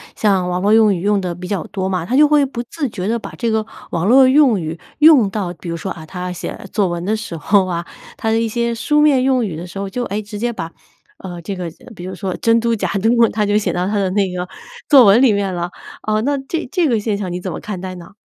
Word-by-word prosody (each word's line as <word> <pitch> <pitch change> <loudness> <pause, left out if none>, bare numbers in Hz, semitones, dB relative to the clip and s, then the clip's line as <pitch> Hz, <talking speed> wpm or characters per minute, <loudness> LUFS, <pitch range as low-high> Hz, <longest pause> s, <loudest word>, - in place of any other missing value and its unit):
像 195 -4 +1
网 180 0 -1
络 205 +2 +3
用 220 -2 +5
语 170 - -5
用 205 +1 +2
得 180 -2 -3
比 180 +1 -8
较 200 -4 -1
多 190 -1 -3
嘛， 180 -3 -2
他 240 - -1
就 300 +2 +7
会 295 -2 +4
不 250 -3 -5
自 285 +4 -4
觉 185 -4 -5
地 230 +3 0
把 - - -8
这 235 -2 -1
个 220 -1 0 0.3
网 170 +2 -1
络 260 +4 +7
用 260 -5 +4
语 160 0 -5 0.2
用 295 -9 +6
到 190 -3 -3
比 175 - -11
如 170 - -3
说， 190 +3 -5
啊， 160 - -8
他 180 +2 -5
写 180 - -6
作 200 -3 +1
文 175 0 -3
的 205 +4 0
时 215 -6 -6
候 190 +5 +2
啊， 170 -2 -3 0.3
他 220 - -2
的 225 - +2
一 230 - 0
些 235 +1 -1
书 295 +6 +1
面 290 -4 +4
用 255 -2 +2
语 170 -6 -5
的 175 +2 -7
时 180 - -10
候， 195 0 -3
就， 245 +5 -3
哎， 205 +2 -3
直 210 0 -8
接 240 +2 -1
把， 165 -6 -6 0.5
呃， 175 -2 -8
这 190 +3 -5
个 180 -2 -4 0.2
比 175 -3 -9
如 185 0 -6
说 190 0 -4
“真 230 0 +4
嘟 235 0 +1
假 220 - -1
嘟”， 200 +3 +1 0.2
他 210 -1 +1
就 205 +1 +2
写 210 - 0
到 180 +1 -1
他 210 - -1
的 190 - 0
那 195 -2 +1
个 180 0 -4 0.4
作 275 -4 +8
文 210 +3 +6
里 255 -5 +5
面 200 -2 -1
了。 175 0 -3 0.4
呃， 215 0 +1
那 280 +4 0
这 330 +2 -2
这 350 -4 +2
个 235 - +2
现 205 -1 -1
象 200 -3 -4
你 175 +1 -4
怎 185 - -4
么 - - -5
看 205 -4 -6
待 185 -1 -6
呢？ 180 +3 -13
205 Hz, 300 characters per minute, -18 LUFS, 180-230 Hz, 0.5 s, 作